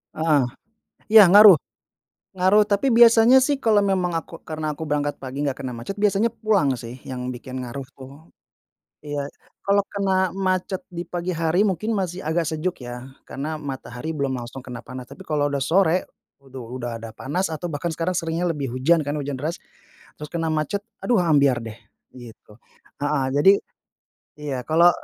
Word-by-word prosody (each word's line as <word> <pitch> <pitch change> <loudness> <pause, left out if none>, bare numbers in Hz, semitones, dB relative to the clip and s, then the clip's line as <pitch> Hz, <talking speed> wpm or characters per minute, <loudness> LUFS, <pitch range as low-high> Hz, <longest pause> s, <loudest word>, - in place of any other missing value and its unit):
Heeh, 155 -2 +3 0.7
iya 215 -2 +9
ngaruh, 205 -3 +10 0.8
ngaruh, 190 +3 +4
tapi 210 +6 +1
biasanya, 235 +2 +7
sih, 280 +2 +2
kalau 220 -2 +4
memang 190 -3 +1
aku 165 +1 -10
karena 155 -1 -4
aku 160 - -10
berangkat 145 -1 -1
pagi 130 +1 -6
nggak 135 0 -3
kena 130 - -4
macet, 120 +10 -6
biasanya 210 +2 +1
pulang, 195 -12 +2
sih, 120 +1 -8
yang 125 -1 -5
bikin 130 +1 -7
ngaruh, 130 +2 -6
tuh. 130 -1 -12 0.9
Iya, 145 -1 -4 0.4
kalau 200 0 +3
kena 200 -1 -1 0.2
macet 185 0 -1
di 175 0 -5
pagi 175 +1 -3
hari 165 +4 +1
mungkin 215 +3 -1
masih 185 -1 -3
agak 165 +2 -1
sejuk, 160 +3 -2
ya, 120 +2 -8 0.2
karena 155 +3 -5
matahari 135 0 -6
belum 140 -3 -2
langsung 120 +2 -7
kena 125 -2 -9
panas, 125 +1 -9
tapi 190 - -12
kalau 145 -2 0
udah 140 -1 -2
sore, 180 0 +2 0.4
aduh, 130 -3 -10
udah 120 -2 -5
ada 115 - -7
panas 175 +8 -2
atau 160 +2 -5
bahkan 145 +4 -3
sekarang 165 +3 -1
seringnya 165 0 -2
lebih 140 -4 -4
hujan, 135 +7 +2
kan, 145 0 -3
hujan 140 -3 -4
deras, 160 +3 -2 0.6
terus 150 - -6
kena 165 0 -2
macet, 155 +7 -2 0.2
aduh, 245 - +1
ambyar, 140 -5 +4
deh, 115 0 -8 0.3
gitu. 120 -2 -14 0.4
Heeh, 145 -2 0
jadi 145 +8 +6 0.9
iya, 145 -3 -4
kalau 170 +2 +5
155 Hz, 170 wpm, -23 LUFS, 135-185 Hz, 0.9 s, ngaruh